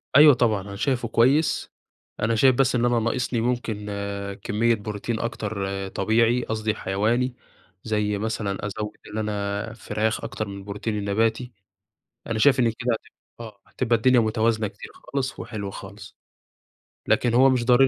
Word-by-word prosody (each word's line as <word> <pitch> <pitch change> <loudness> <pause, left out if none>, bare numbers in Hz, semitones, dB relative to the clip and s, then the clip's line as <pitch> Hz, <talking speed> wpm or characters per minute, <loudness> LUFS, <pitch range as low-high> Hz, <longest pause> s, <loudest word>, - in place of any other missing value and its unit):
أيوه 150 0 +9
طبعًا، 110 -5 +2
أنا 100 0 -8
شايفه 120 +2 0
كويس، 130 +8 +2 0.5
أنا 115 +2 +1
شايف 130 +3 +5
بس 135 0 +2
إن 120 0 +2
أنا 120 -1 +3
ناقصني 120 +1 -1
ممكن 115 -3 -2 0.6
كمّية 115 +3 +2
بروتين 105 +2 -4
أكتر 100 -4 -3
طبيعي، 115 +5 +2
قصدي 110 -1 -1
حيواني، 115 +6 0 0.5
زي 105 -2 0
مثلًا 105 -2 -3
أزوّد 105 +1 -5 0.2
إن - - -4
أنا 105 +1 -2
فراخ 110 -1 -2
أكتر 110 - -4
من 100 - -7
البروتين 105 +2 -4
النباتي، 110 +4 0 0.8
أنا 115 -2 -2
شايف 135 +2 +5
إن 120 - +4
كده 120 +2 -2
هتب 110 - -7 0.3
آه، 110 -4 -10
هتبقى 120 -2 0
الدنيا 125 +2 +4
متوازنة 110 -1 +1
كتير - - -11
خالص 135 -2 -4
وحلوة 100 -4 -5
خالص. 95 +1 -11 0.9
لكن 120 -1 +2
هو 130 +2 +6
مش 125 -2 +1
ضروري 125 +2 +6
110 Hz, 150 wpm, -24 LUFS, 105-120 Hz, 0.9 s, أيوه